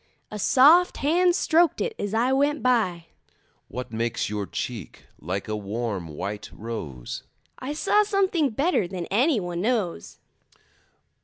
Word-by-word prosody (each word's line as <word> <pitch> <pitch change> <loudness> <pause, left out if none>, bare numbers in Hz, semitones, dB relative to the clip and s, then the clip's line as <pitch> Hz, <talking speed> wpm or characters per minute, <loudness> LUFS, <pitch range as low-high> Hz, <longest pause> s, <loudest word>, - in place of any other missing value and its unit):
A 210 - -5
soft 305 - +5
hand 345 +5 +3
stroked 335 -1 +3
it 460 0 -1
as 205 +1 -2
I 240 +3 +2
went 285 +2 +1
by. 215 -10 +1 0.6
What 125 -2 -7
makes 115 -2 -1
your 105 -2 -3
cheek 115 -9 -6
like 95 +4 -4
a 110 - -2
warm 105 -3 -3
white 100 +7 -6
rose? 75 - -6 0.4
I 265 +3 -4
saw 415 +7 +3
something 385 -7 +1
better 270 - +1
than 180 -1 -5
any 250 +5 +3
one 175 -2 -4
knows. 205 - -2
205 Hz, 140 wpm, -25 LUFS, -, 0.6 s, soft